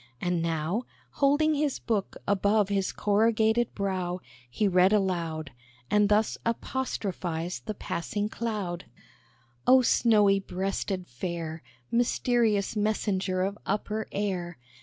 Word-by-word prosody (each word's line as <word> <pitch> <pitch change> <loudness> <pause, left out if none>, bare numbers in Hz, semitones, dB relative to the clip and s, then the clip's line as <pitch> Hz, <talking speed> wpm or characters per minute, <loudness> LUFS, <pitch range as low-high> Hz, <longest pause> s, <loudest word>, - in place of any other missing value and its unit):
And 175 +2 0
now, 165 +8 -1 0.2
Holding 290 +2 +3
his 295 -2 0
book 210 -5 -2
above 200 +1 +2
his 195 -2 0
corrugated 220 +2 +2
brow 185 -3 -2 0.3
He 205 - +1
read 185 0 +4
aloud, 170 -7 0 0.4
And 210 -1 +4
thus 210 +1 +2
apostrophized 190 -8 -3
the 215 - -3
passing 205 +5 -3
cloud: 210 -6 -3 0.8
"Oh, 255 0 +7
snowy 210 -5 +4
breasted 190 0 -3
Fair! 160 +4 -5 0.3
Mysterious 235 -3 +2
messenger 200 -3 0
of 200 +2 -3
upper 210 +2 -2
air! 180 -5 -2
200 Hz, 110 wpm, -28 LUFS, 180-220 Hz, 0.8 s, Oh